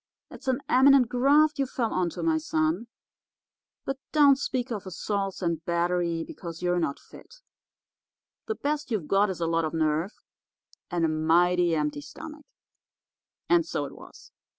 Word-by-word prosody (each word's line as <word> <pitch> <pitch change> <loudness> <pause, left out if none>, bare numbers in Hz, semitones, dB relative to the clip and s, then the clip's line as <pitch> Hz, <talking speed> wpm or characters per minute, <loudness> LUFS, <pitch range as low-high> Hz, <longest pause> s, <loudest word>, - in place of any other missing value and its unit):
It's 265 - -12
an 260 +1 +1
eminent 265 -1 +5
graft 285 +4 +3
you 275 - +1
fell 235 -3 -2
onto, 180 -2 -2
my 320 -1 +2
son. 315 -5 -1 1.0
But 270 0 -3
don't 285 -3 +6
speak 260 -2 -3
of 205 -4 -5
assaults 195 +1 -3
and 165 -2 -1
battery, 170 -1 0
because 170 0 -9
you're 175 0 +1
not 150 -4 -1
fit. 470 - -16 1.1
The 440 - -2
best 295 -3 -2
you've 205 -10 -2
got 200 +1 +3
is 185 - -4
a - - +1
lot 165 0 +1
of 155 +1 -3
nerve 160 +4 0 0.8
and 175 -2 0
a - - +2
mighty 170 +2 +2
empty 150 -1 -2
stomach.' 300 - -11 1.0
And 345 -1 +4
so 330 - -3
it - - -9
was. - - -15
195 Hz, 155 wpm, -27 LUFS, 170-275 Hz, 1.1 s, don't